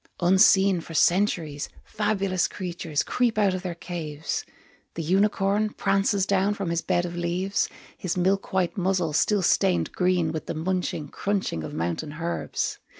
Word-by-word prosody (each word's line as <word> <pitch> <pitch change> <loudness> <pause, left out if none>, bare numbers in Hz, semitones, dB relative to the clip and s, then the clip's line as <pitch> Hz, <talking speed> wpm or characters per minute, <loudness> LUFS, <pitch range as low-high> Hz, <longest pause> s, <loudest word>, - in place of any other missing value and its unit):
Unseen 190 0 +5
for 165 - -9
centuries, 170 -5 +1
Fabulous 195 -3 0
creatures 170 -5 -3
creep 240 -3 0
out 200 -3 +3
of 185 - -3
their 180 -2 -4
caves, 160 -3 -4 0.5
The 165 - -3
unicorn 200 +4 +2
Prances 195 0 +1
down 200 +1 +1
from 195 -4 -3
his 170 0 0
bed 175 0 0
of 175 0 -5
leaves, 175 +3 -1 0.3
His 185 -1 -2
milk 190 +2 +1
white 185 -3 0
muzzle 185 -4 0
still 200 +5 +2
stained 185 +1 +2
green 180 -3 +1
With 160 -2 -5
the - - -3
munching, 165 -3 -2
crunching 195 - -2
of 75 - -6
mountain 85 - -3
herbs. 165 +2 -3
185 Hz, 150 wpm, -25 LUFS, 170-195 Hz, 0.5 s, Unseen